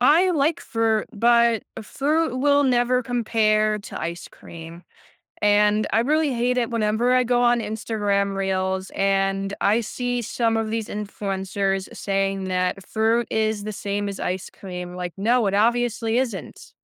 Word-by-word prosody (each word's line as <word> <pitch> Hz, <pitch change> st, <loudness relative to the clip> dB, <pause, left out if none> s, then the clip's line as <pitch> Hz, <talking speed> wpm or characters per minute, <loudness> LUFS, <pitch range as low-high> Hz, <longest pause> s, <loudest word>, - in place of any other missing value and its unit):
I 330 Hz, +9 st, +5 dB
like 310 Hz, 0 st, +1 dB
fruit, 225 Hz, -1 st, 0 dB
but 235 Hz, 0 st, +3 dB, 0.2 s
fruit 295 Hz, +5 st, 0 dB
will 285 Hz, +1 st, +3 dB
never 250 Hz, 0 st, +2 dB
compare 215 Hz, -3 st, +1 dB
to 200 Hz, -, -8 dB
ice 170 Hz, +1 st, -5 dB
cream, 165 Hz, +1 st, -11 dB, 0.6 s
and 210 Hz, +1 st, +3 dB
I 225 Hz, -, +3 dB
really 300 Hz, +3 st, +1 dB
hate 245 Hz, +1 st, 0 dB
it 235 Hz, -, -1 dB
whenever 230 Hz, +2 st, +1 dB
I 255 Hz, -, +4 dB
go 245 Hz, 0 st, +1 dB
on 240 Hz, 0 st, +3 dB
Instagram 205 Hz, -3 st, -1 dB
reels 190 Hz, 0 st, -1 dB
and 195 Hz, 0 st, 0 dB
I 215 Hz, +4 st, +2 dB
see 245 Hz, +2 st, -3 dB
some 225 Hz, 0 st, 0 dB
of 225 Hz, -1 st, -1 dB
these 225 Hz, -1 st, -2 dB
influencers 195 Hz, -1 st, -3 dB
saying 195 Hz, -1 st, -1 dB
that 185 Hz, +1 st, -1 dB
fruit 225 Hz, +1 st, +1 dB
is 220 Hz, -1 st, 0 dB
the 215 Hz, -, -3 dB
same 205 Hz, +1 st, -3 dB
as 200 Hz, -1 st, -5 dB
ice 185 Hz, 0 st, -3 dB
cream, 180 Hz, -2 st, -8 dB
like, 180 Hz, -1 st, -5 dB
no, 230 Hz, +2 st, +2 dB
it 195 Hz, -, -1 dB
obviously 230 Hz, +1 st, +1 dB
isn't. 205 Hz, -, -5 dB
215 Hz, 155 wpm, -23 LUFS, 195-240 Hz, 0.6 s, I